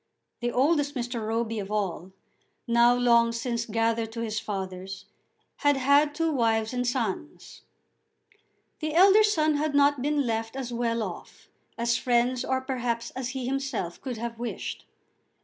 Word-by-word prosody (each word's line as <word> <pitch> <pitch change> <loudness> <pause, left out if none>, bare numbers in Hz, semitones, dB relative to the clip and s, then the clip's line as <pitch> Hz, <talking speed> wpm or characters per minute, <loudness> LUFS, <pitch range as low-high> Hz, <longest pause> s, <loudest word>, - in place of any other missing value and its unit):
The 240 0 -1
oldest 290 +3 +2
Mr. 240 -2 -3
Roby 225 0 -1
of 195 -1 -5
all, 190 -4 -2 0.6
now 235 +1 +5
long 235 -1 +4
since 235 0 -2
gathered 225 0 0
to 230 - -4
his 220 -1 -2
fathers, 190 -3 -6 0.5
had 290 -2 +2
had 285 +3 +3
two 330 +1 +1
wives 225 -4 +1
and 245 0 0
two 245 - +1
sons. 245 +3 -4 1.2
The 310 0 -3
elder 390 +4 +7
son 310 -8 +2
had 300 0 -1
not 285 -1 +4
been 290 0 +1
left 225 0 -2
as 255 -3 -4
well 230 -1 0
off 185 -4 -9 0.3
as 235 0 +1
friends, 245 0 +1
or 260 0 0
perhaps 240 -3 -3
as 255 -1 -4
he 255 - -3
himself, 260 -9 -3
could 255 -4 -5
have 230 0 -5
wished. 240 0 -5
240 Hz, 155 wpm, -27 LUFS, 225-275 Hz, 1.2 s, elder